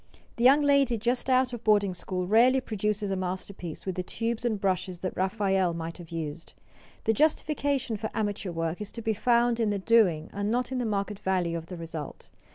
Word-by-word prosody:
The 235 - -1
young 275 +4 +6
lady 280 -4 +3
just 245 +4 -1
out 255 -1 +3
of 240 -1 -6
boarding 205 -3 +3
school 180 0 -4
rarely 240 +7 +5
produces 210 -3 -2
a - - +1
masterpiece 185 -2 -5
with 190 - -2
the 185 - -2
tubes 230 +5 -3
and 225 -4 0
brushes 185 -2 -1
that 185 - -3
Raphael 190 -2 +1
might 165 +1 -6
have 170 -2 -10
used. 165 -1 -6 0.5
The 225 - +2
justification 285 -3 +1
for 220 +1 -4
amateur 205 -2 -2
work 165 +2 -3
is 210 - -5
to 230 - -6
be 220 - +1
found 235 +1 +2
in 225 -2 +2
the 205 - 0
doing 190 -7 +3
and 205 +1 -2
not 245 +3 0
in 260 - -1
the 245 - -1
market 200 -1 -2
value 180 -3 0
of 165 -1 -5
the 180 - -7
result. 165 -2 -7
205 Hz, 205 wpm, -28 LUFS, 180-235 Hz, 0.5 s, young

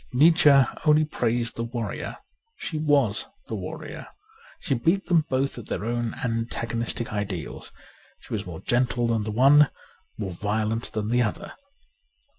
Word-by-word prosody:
Nietzsche 160 +4 +6 0.3
only 155 0 +5
praised 120 -4 -1
the 115 - -1
warrior; 115 -1 -4 0.4
she 155 - -4
was 140 -8 +2 0.2
the - - -6
warrior. - - -6 0.5
She 140 - -1
beat 165 +10 +1
them 170 -3 +3
both 130 -1 0
at 115 - -10
their 105 - -3
own 120 0 -2
antagonistic 115 -1 -2
ideals; 100 -7 -4 0.5
she - - -10
was 100 -3 -3
more 85 0 -7
gentle 120 +1 +1
than 115 -2 0
the 110 - -3
one, 140 +6 +6 0.5
more 100 -4 -4
violent 110 +5 -2
than 105 0 -2
the 125 0 +3
other. 110 -3 -2
120 Hz, 145 wpm, -25 LUFS, 110-140 Hz, 0.5 s, Nietzsche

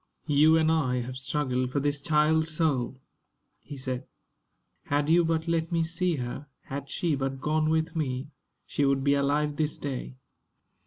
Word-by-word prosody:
"You 155 +2 +5
and 160 0 +3
I 130 -6 +1
have 130 +2 -6
struggled 130 -2 -1
for 145 - 0
this 145 0 -1
child's 160 +1 +2
soul," 140 -6 0 0.6
he 145 - -10
said. 130 0 -4 0.8
"Had 145 +2 +1
you 170 +1 +6
but 165 0 0
let 165 0 0
me 165 -1 +2
see 170 +1 0
her 130 +2 -5
had 140 0 -6
she 170 -3 0
but 135 -1 -2
gone 155 +2 +1
with 160 +1 0
me 140 -2 -2 0.3
she 145 - -1
would 135 -1 +2
be 140 0 +4
alive 145 +1 +1
this 155 -1 0
day." 130 -2 -5
145 Hz, 165 wpm, -28 LUFS, 135-160 Hz, 0.8 s, you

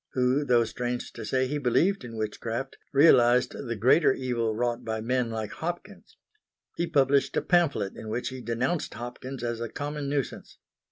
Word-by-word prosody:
who, 130 +3 +2
though 120 -4 +4
strange 120 +2 -4
to - - -7
say 130 0 +1
he 145 +3 -2
believed 155 +8 +2
in 115 -2 -8
witchcraft, 115 +4 -4 0.2
realised 125 -4 +5
the 120 -3 -5
greater 130 +10 +4
evil 120 -4 -1
wrought 120 +1 -1
by 110 -1 -3
men 125 +1 0
like 110 -2 -4
Hopkins. 175 +4 -7 0.6
He 170 - -1
published 140 -3 +2
a - - +3
pamphlet 150 - +2
in 110 - -8
which 120 +3 -2
he 130 -1 -7
denounced 125 +8 -2
Hopkins 120 +2 -7
as 120 -1 -2
a 115 - -3
common 145 +1 -4
nuisance. 140 -3 -3
125 Hz, 170 wpm, -27 LUFS, 115-140 Hz, 0.6 s, realised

